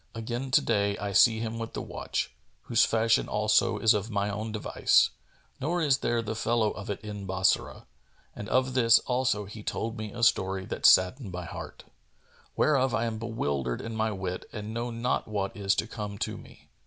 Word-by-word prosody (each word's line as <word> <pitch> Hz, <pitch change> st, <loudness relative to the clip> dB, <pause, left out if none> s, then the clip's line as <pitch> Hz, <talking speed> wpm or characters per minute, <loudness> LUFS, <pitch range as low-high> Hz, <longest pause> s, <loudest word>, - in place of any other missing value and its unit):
Again 120 Hz, +4 st, -4 dB
to 130 Hz, -, +4 dB
day 100 Hz, -3 st, 0 dB
I 100 Hz, 0 st, -4 dB
see 110 Hz, +3 st, +5 dB
him 115 Hz, 0 st, -4 dB
with 115 Hz, 0 st, -5 dB
the -, -, -4 dB
watch, -, -, -4 dB, 0.3 s
whose 115 Hz, -2 st, +3 dB
fashion 115 Hz, 0 st, +2 dB
also 110 Hz, +2 st, +2 dB
is 110 Hz, 0 st, +4 dB
of 105 Hz, +1 st, -2 dB
my 100 Hz, -1 st, -1 dB
own 110 Hz, +2 st, -4 dB
device, 105 Hz, -1 st, +2 dB, 0.5 s
nor 170 Hz, +6 st, -1 dB
is 140 Hz, -5 st, +2 dB
there 120 Hz, -1 st, 0 dB
the 110 Hz, 0 st, -4 dB
fellow 115 Hz, -1 st, +1 dB
of 105 Hz, -, -8 dB
it 100 Hz, -, -3 dB
in 105 Hz, -2 st, -7 dB
Bassorah, 95 Hz, 0 st, 0 dB, 0.5 s
and 105 Hz, -, -7 dB
of 130 Hz, +1 st, +1 dB
this 115 Hz, -2 st, +6 dB
also 125 Hz, -5 st, 0 dB
he 105 Hz, +2 st, -9 dB
told 115 Hz, +2 st, -3 dB
me 110 Hz, -1 st, -5 dB
a 120 Hz, +1 st, -5 dB
story 95 Hz, -4 st, +2 dB
that -, -, +2 dB
saddened 95 Hz, +4 st, +4 dB
my 90 Hz, 0 st, -5 dB
heart. 85 Hz, -, -8 dB, 0.7 s
Wherefore 130 Hz, -4 st, +2 dB
I 115 Hz, -, 0 dB
am 110 Hz, -1 st, -3 dB
bewildered 70 Hz, -, -2 dB
in 115 Hz, 0 st, -6 dB
my 110 Hz, 0 st, 0 dB
wit 95 Hz, -2 st, -5 dB
and 105 Hz, 0 st, -6 dB
know 120 Hz, +1 st, -3 dB
not 115 Hz, +2 st, -1 dB
what 100 Hz, -2 st, -3 dB
is 100 Hz, 0 st, +1 dB
to -, -, 0 dB
come 105 Hz, -3 st, -6 dB
to -, -, -3 dB
me." -, -, -15 dB
110 Hz, 195 wpm, -28 LUFS, 100-115 Hz, 0.7 s, this